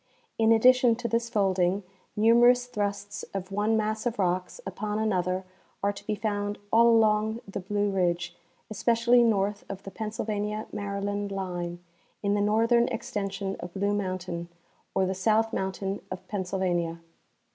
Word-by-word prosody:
In 225 Hz, 0 st, +4 dB
addition 245 Hz, +1 st, +6 dB
to 235 Hz, +1 st, -3 dB
this 235 Hz, 0 st, 0 dB
folding, 195 Hz, -3 st, +1 dB, 0.3 s
numer 230 Hz, +3 st, +6 dB
ous 245 Hz, 0 st, +3 dB
thrusts 205 Hz, -3 st, -3 dB
of 190 Hz, 0 st, -4 dB
one 210 Hz, +3 st, +1 dB
mass 215 Hz, +2 st, -1 dB
of 240 Hz, 0 st, -2 dB
rocks 180 Hz, -, -1 dB
upon 210 Hz, 0 st, -3 dB
another 185 Hz, -4 st, 0 dB, 0.4 s
are 200 Hz, 0 st, +2 dB
to 200 Hz, -, -11 dB
be 215 Hz, -, 0 dB
found 205 Hz, -1 st, -2 dB, 0.2 s
all 235 Hz, +1 st, +7 dB
along 220 Hz, -1 st, +3 dB
the 195 Hz, -, -4 dB
Blue 205 Hz, +2 st, -1 dB
ridge, 175 Hz, -2 st, 0 dB, 0.3 s
especially 235 Hz, +3 st, +3 dB
north 205 Hz, -3 st, +1 dB
of 195 Hz, 0 st, -6 dB
the 195 Hz, -, -8 dB
Pennsylvania 210 Hz, 0 st, -3 dB
Maryland 200 Hz, 0 st, -3 dB
line, 175 Hz, -2 st, -4 dB, 0.4 s
in 200 Hz, 0 st, +2 dB
the 205 Hz, -, +1 dB
northern 230 Hz, +3 st, +3 dB
extension 195 Hz, -1 st, -3 dB
of 175 Hz, -, -8 dB
Blue 200 Hz, +1 st, +1 dB
mountain, 185 Hz, -3 st, -3 dB, 0.5 s
or 190 Hz, -, +3 dB
the 190 Hz, -, -1 dB
South 220 Hz, +4 st, +2 dB
mountain 190 Hz, +1 st, -2 dB
of 185 Hz, 0 st, -7 dB
Pennsylvania. 180 Hz, -4 st, -1 dB
205 Hz, 150 wpm, -27 LUFS, 190-220 Hz, 0.5 s, all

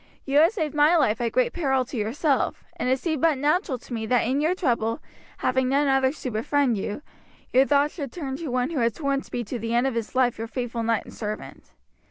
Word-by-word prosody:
You 280 Hz, +1 st, +3 dB
had 330 Hz, +4 st, +6 dB
saved 320 Hz, -10 st, -2 dB
my 300 Hz, +3 st, +4 dB
life 240 Hz, -7 st, +2 dB
at 235 Hz, -1 st, 0 dB
great 250 Hz, +1 st, +1 dB
peril 265 Hz, -6 st, +1 dB
to 260 Hz, -, -9 dB
yourself, 255 Hz, +6 st, 0 dB
and 250 Hz, -, -2 dB
it 260 Hz, -, +3 dB
seemed 310 Hz, -1 st, -2 dB
but 320 Hz, -4 st, +3 dB
natural 295 Hz, +1 st, +1 dB
to 245 Hz, -, -11 dB
me 220 Hz, -1 st, -3 dB
that 245 Hz, +1 st, +3 dB
in 265 Hz, +4 st, +1 dB
your 325 Hz, +4 st, +2 dB
trouble, 235 Hz, -, 0 dB, 0.4 s
having 255 Hz, 0 st, +1 dB
none 280 Hz, +2 st, +2 dB
others 270 Hz, +1 st, +2 dB
to 255 Hz, -, -2 dB
befriend 245 Hz, +3 st, +1 dB
you, 205 Hz, +7 st, -4 dB, 0.5 s
your 265 Hz, +2 st, +5 dB
thoughts 290 Hz, +1 st, +3 dB
should 280 Hz, -7 st, -5 dB
turn 275 Hz, -6 st, -5 dB
to 330 Hz, 0 st, -6 dB
one 250 Hz, +3 st, 0 dB
who 305 Hz, -, -1 dB
had 230 Hz, -2 st, +1 dB
sworn 280 Hz, -3 st, -1 dB
to -, -, -16 dB
be 240 Hz, -, -3 dB
to 235 Hz, +3 st, -5 dB
the 230 Hz, +1 st, -2 dB
end 240 Hz, +2 st, +3 dB
of 270 Hz, -, 0 dB
his 230 Hz, +1 st, -4 dB
life 250 Hz, -3 st, +2 dB
your 225 Hz, -, -3 dB
faithful 235 Hz, 0 st, -3 dB
knight 230 Hz, -1 st, 0 dB
and -, -, -12 dB
servant. 215 Hz, -1 st, -7 dB
260 Hz, 245 wpm, -25 LUFS, 235-290 Hz, 0.5 s, had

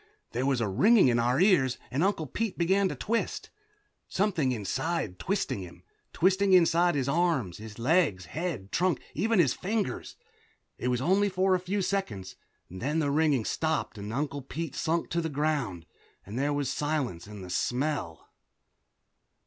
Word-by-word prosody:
There 125 Hz, +3 st, -1 dB
was 135 Hz, -3 st, +1 dB
a 110 Hz, -, +1 dB
ringing 140 Hz, -, +5 dB
in 120 Hz, -1 st, +2 dB
our 120 Hz, +3 st, +2 dB
ears 175 Hz, -10 st, +4 dB
and 140 Hz, +6 st, +1 dB
Uncle 190 Hz, -5 st, +1 dB
Pete 220 Hz, -, -3 dB
began 190 Hz, +3 st, +2 dB
to -, -, -4 dB
twist. 230 Hz, +2 st, -2 dB, 0.6 s
Something 180 Hz, -9 st, +1 dB
inside 125 Hz, -, -1 dB
him -, -, -18 dB
twisted 195 Hz, -, -1 dB
him, 90 Hz, -2 st, -10 dB, 0.3 s
twisting 190 Hz, +2 st, +3 dB
inside 175 Hz, -1 st, +4 dB
his 135 Hz, -2 st, 0 dB
arms, 145 Hz, -, 0 dB
his 110 Hz, -1 st, -9 dB
legs, 120 Hz, -, +2 dB
head, 150 Hz, -, -4 dB
trunk, 180 Hz, 0 st, +1 dB
even 225 Hz, +2 st, +1 dB
his 165 Hz, -8 st, +4 dB
fingers. 210 Hz, +2 st, -3 dB, 0.6 s
It -, -, -2 dB
was 125 Hz, -1 st, 0 dB
only 195 Hz, +7 st, +3 dB
for 190 Hz, 0 st, +2 dB
a 185 Hz, -, +3 dB
few 190 Hz, +2 st, -2 dB
seconds. 180 Hz, -, -3 dB, 0.3 s
Then 130 Hz, -, -3 dB
the 145 Hz, -3 st, +1 dB
ringing 145 Hz, -6 st, +2 dB
stopped, 160 Hz, -9 st, -1 dB
and 105 Hz, +1 st, -6 dB
Uncle 140 Hz, +2 st, -2 dB
Pete 155 Hz, +2 st, -5 dB
sunk 160 Hz, +2 st, -1 dB
to 170 Hz, -, +1 dB
the 160 Hz, -, -2 dB
ground, 140 Hz, -, -1 dB, 0.4 s
and 105 Hz, +6 st, -5 dB
there 145 Hz, +2 st, +1 dB
was 145 Hz, -2 st, -1 dB
the -, -, -4 dB
silence 140 Hz, -, -2 dB
and 105 Hz, -2 st, -9 dB
the 90 Hz, -, -8 dB
smell. 125 Hz, -, -2 dB
150 Hz, 170 wpm, -28 LUFS, 120-180 Hz, 0.6 s, ringing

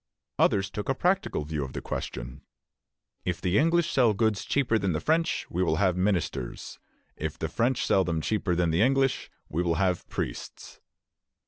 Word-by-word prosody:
Others 100 Hz, 0 st, +3 dB
took 105 Hz, -, -5 dB
a 135 Hz, -, +2 dB
practical 180 Hz, -, 0 dB
view 75 Hz, -1 st, -2 dB
of 65 Hz, -, -7 dB
the -, -, -3 dB
question. -, -, -5 dB, 0.8 s
"If 90 Hz, -2 st, -2 dB
the 90 Hz, +2 st, +2 dB
English 165 Hz, +1 st, +2 dB
sell 120 Hz, -5 st, +3 dB
goods 110 Hz, -1 st, +1 dB
cheaper 125 Hz, -5 st, +1 dB
than 95 Hz, -4 st, 0 dB
the 75 Hz, -, -1 dB
French, 165 Hz, +1 st, +1 dB
we 90 Hz, -, -2 dB
will 80 Hz, -4 st, +2 dB
have 95 Hz, 0 st, +2 dB
ministers; 90 Hz, -10 st, -2 dB, 0.4 s
if -, -, -4 dB
the -, -, -2 dB
French 120 Hz, +2 st, 0 dB
sell 95 Hz, -, +3 dB
them 85 Hz, -2 st, -1 dB
cheaper 95 Hz, +1 st, 0 dB
than 85 Hz, -1 st, +1 dB
the 80 Hz, +4 st, +2 dB
English, 135 Hz, +2 st, +2 dB, 0.2 s
we 80 Hz, -, -1 dB
will 85 Hz, -2 st, +1 dB
have 90 Hz, -1 st, 0 dB
priests." -, -, -6 dB
95 Hz, 180 wpm, -27 LUFS, 85-120 Hz, 0.8 s, Others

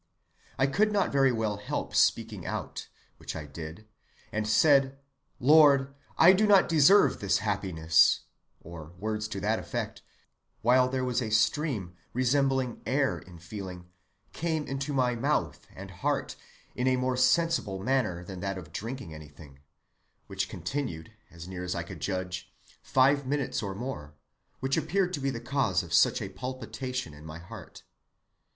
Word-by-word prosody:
I 135 Hz, -, +3 dB
could 210 Hz, +10 st, +2 dB
not 200 Hz, -2 st, +1 dB
very 135 Hz, -1 st, +4 dB
well 110 Hz, -3 st, -1 dB
help 105 Hz, -, -4 dB
speaking -, -, +2 dB
out, -, -, -5 dB, 0.3 s
which -, -, -7 dB
I 80 Hz, -2 st, -6 dB
did, 80 Hz, +7 st, -9 dB, 0.4 s
and 110 Hz, -1 st, -2 dB
said, 135 Hz, +3 st, +4 dB, 0.4 s
Lord, 140 Hz, -1 st, +5 dB, 0.2 s
I 175 Hz, +3 st, +8 dB
do 210 Hz, +3 st, +3 dB
not 200 Hz, -2 st, +6 dB
deserve 165 Hz, +5 st, +5 dB
this 100 Hz, -4 st, +2 dB
happiness, 90 Hz, -6 st, +2 dB, 0.4 s
or 85 Hz, -1 st, -10 dB
words 110 Hz, +2 st, -3 dB
to 105 Hz, -2 st, -5 dB
that 110 Hz, +3 st, +1 dB
effect, -, -, -5 dB, 0.6 s
while 125 Hz, +2 st, +4 dB
there 130 Hz, 0 st, -1 dB
was 125 Hz, 0 st, 0 dB
a 115 Hz, -, -3 dB
stream 110 Hz, -, 0 dB, 0.2 s
(resembling 130 Hz, 0 st, +1 dB
air 135 Hz, +2 st, +1 dB
in 90 Hz, -2 st, -14 dB
feeling) 90 Hz, 0 st, -8 dB, 0.4 s
came 160 Hz, -2 st, -2 dB
into 135 Hz, +2 st, -3 dB
my 130 Hz, -3 st, +1 dB
mouth 120 Hz, -, -1 dB
and -, -, -9 dB
heart -, -, -2 dB, 0.4 s
in 125 Hz, -, -1 dB
a 130 Hz, -, +4 dB
more 130 Hz, 0 st, 0 dB
sensible 130 Hz, -, +2 dB
manner 105 Hz, -5 st, -1 dB
than 95 Hz, 0 st, -8 dB
that 95 Hz, +1 st, -3 dB
of 80 Hz, -4 st, -10 dB
drinking 115 Hz, -3 st, -6 dB
anything, 75 Hz, -2 st, -13 dB, 0.7 s
which -, -, -3 dB
continued, 110 Hz, -, -4 dB, 0.2 s
as 85 Hz, 0 st, -11 dB
near 90 Hz, -1 st, -6 dB
as 90 Hz, -, -3 dB
I 85 Hz, -, -2 dB
could 85 Hz, -, -10 dB
judge, 95 Hz, -1 st, -4 dB, 0.3 s
five 135 Hz, +1 st, +3 dB
minutes 140 Hz, -5 st, -1 dB
or 100 Hz, -3 st, -4 dB
more, 90 Hz, -, -6 dB, 0.5 s
which 135 Hz, +2 st, 0 dB
appeared 180 Hz, +4 st, 0 dB
to 145 Hz, -, -2 dB
be 135 Hz, 0 st, -1 dB
the 120 Hz, -3 st, -4 dB
cause 120 Hz, -7 st, 0 dB
of 85 Hz, -1 st, -8 dB
such 85 Hz, -, +4 dB
a -, -, -5 dB
palpitation 125 Hz, -, -5 dB
of 75 Hz, +1 st, -13 dB
my 80 Hz, 0 st, -8 dB
heart. 90 Hz, +2 st, -11 dB
115 Hz, 160 wpm, -28 LUFS, 90-135 Hz, 0.7 s, I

